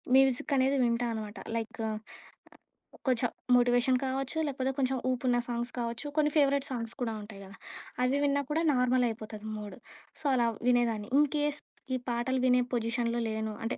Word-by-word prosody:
మ్యూజిక్కనేది 270 Hz, +1 st, +3 dB
వింటా 240 Hz, 0 st, +1 dB
అనమాట. 215 Hz, -2 st, -6 dB, 0.2 s
లైకు 225 Hz, 0 st, -3 dB, 1.2 s
కొంచెం 245 Hz, -1 st, +2 dB, 0.3 s
మోటివేషన్ 245 Hz, +1 st, +4 dB
కావచ్చు, 270 Hz, +3 st, -2 dB
లేపోతే 265 Hz, -1 st, -1 dB
కొంచెం 265 Hz, 0 st, +1 dB
ఊపున్న 245 Hz, -1 st, +1 dB
సాంగ్స్ 240 Hz, 0 st, -2 dB
కావచ్చు 235 Hz, +3 st, -3 dB
కొన్ని 300 Hz, -1 st, +3 dB
ఫేవరెట్ 280 Hz, -1 st, +3 dB
సాంగ్స్ 230 Hz, -3 st, -3 dB
కూడా 230 Hz, -2 st, -1 dB
ఉంటాయి 205 Hz, -1 st, -10 dB
కదా! 195 Hz, +1 st, -12 dB, 0.5 s
అవి 260 Hz, +3 st, +2 dB
విన్నా 285 Hz, 0 st, +2 dB
కూడా 320 Hz, +2 st, +1 dB
నార్మలయిపోతది 235 Hz, -4 st, 0 dB
మూడు. 210 Hz, -1 st, -8 dB, 0.4 s
సో, -, -, -14 dB
అలా 240 Hz, -2 st, +3 dB, 0.2 s
వినేదాన్ని 230 Hz, -4 st, +1 dB
ఇన్‌కేస్ 295 Hz, 0 st, +1 dB, 0.4 s
ఈ -, -, +1 dB
పాటలు 250 Hz, +2 st, 0 dB
వినే 250 Hz, 0 st, +5 dB
పొజిషన్‌లో 235 Hz, 0 st, 0 dB
లేను 220 Hz, 0 st, -3 dB
అంటే 230 Hz, -, -2 dB
245 Hz, 145 wpm, -30 LUFS, 230-265 Hz, 1.2 s, వినే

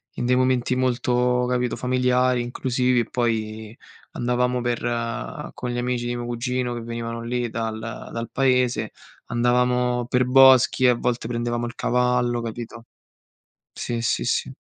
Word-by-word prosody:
in -, -, -3 dB
dei 125 Hz, +1 st, +3 dB
momenti 130 Hz, -1 st, +1 dB
molto, 125 Hz, -1 st, +1 dB
capito, 125 Hz, -1 st, 0 dB
familiari, 125 Hz, 0 st, +2 dB
inclusivi 125 Hz, +1 st, 0 dB
e 120 Hz, -, +1 dB
poi 110 Hz, -2 st, -2 dB, 0.4 s
andavamo 125 Hz, +1 st, 0 dB
per 120 Hz, -1 st, -1 dB, 0.7 s
con 125 Hz, -, -5 dB
gli 120 Hz, -, -3 dB
amici 120 Hz, 0 st, -1 dB
di 120 Hz, 0 st, -2 dB
mio 120 Hz, -, -4 dB
cugino, 120 Hz, +1 st, -2 dB
che 120 Hz, -, -5 dB
venivano 115 Hz, 0 st, -5 dB
lì 120 Hz, 0 st, -2 dB
dal 110 Hz, -1 st, -3 dB
dal 115 Hz, +1 st, -6 dB
paese, 125 Hz, -5 st, +1 dB, 0.4 s
andavamo 125 Hz, 0 st, +1 dB
per 125 Hz, +1 st, +2 dB
boschi 130 Hz, 0 st, +6 dB
e -, -, +7 dB
a 125 Hz, -, +4 dB
volte 120 Hz, -1 st, -2 dB
prendevamo 120 Hz, 0 st, -2 dB
il 120 Hz, 0 st, -7 dB
cavallo, 125 Hz, -1 st, +1 dB
capito? 115 Hz, 0 st, -7 dB, 0.9 s
Sì, 120 Hz, -1 st, -3 dB
sì, 115 Hz, -, 0 dB
sì. -, -, -1 dB
120 Hz, 145 wpm, -23 LUFS, 120-125 Hz, 0.9 s, e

